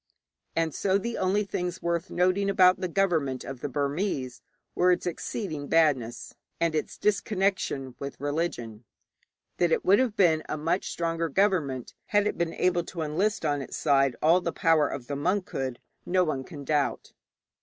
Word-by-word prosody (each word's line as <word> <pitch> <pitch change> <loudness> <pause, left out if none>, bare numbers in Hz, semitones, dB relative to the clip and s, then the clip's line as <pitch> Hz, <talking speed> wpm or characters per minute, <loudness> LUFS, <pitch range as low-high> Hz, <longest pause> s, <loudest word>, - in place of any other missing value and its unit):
And 165 -2 0
so 195 0 +1
the 235 +3 -3
only 190 +3 +2
things 180 -2 -3
worth 170 0 -1
noting 185 +3 +1
about 185 -2 +5
the 185 - 0
government 165 -8 0
of 135 -2 -7
the 145 - -3
Burmese 140 -1 -2 0.3
were 180 +1 +3
its 180 - 0
exceeding 165 -3 -4
badness, 140 -8 +1 0.3
and 170 -1 +1
its 155 - -2
disconnection 195 - 0
with 140 0 -6
religion. 140 -7 -3 0.7
That 175 -2 +2
it - - +1
would 200 +4 +6
have 250 -5 +1
been 165 -6 +4
a 155 - -2
much 165 +5 -1
stronger 165 -1 -1
government 155 - 0
had 205 0 +2
it 210 - 0
been 170 -1 -2
able 175 -1 +1
to 170 - -6
enlist 180 +5 0
on 145 -2 0
its - - -6
side 135 -4 +3
all 170 +4 +5
the - - -2
power 160 -3 +3
of 130 -3 -6
the 140 - -4
monkhood, 145 -6 -1 0.3
none 160 -8 0
can 150 -5 -9
doubt. 145 0 -1
165 Hz, 165 wpm, -27 LUFS, 145-185 Hz, 0.7 s, would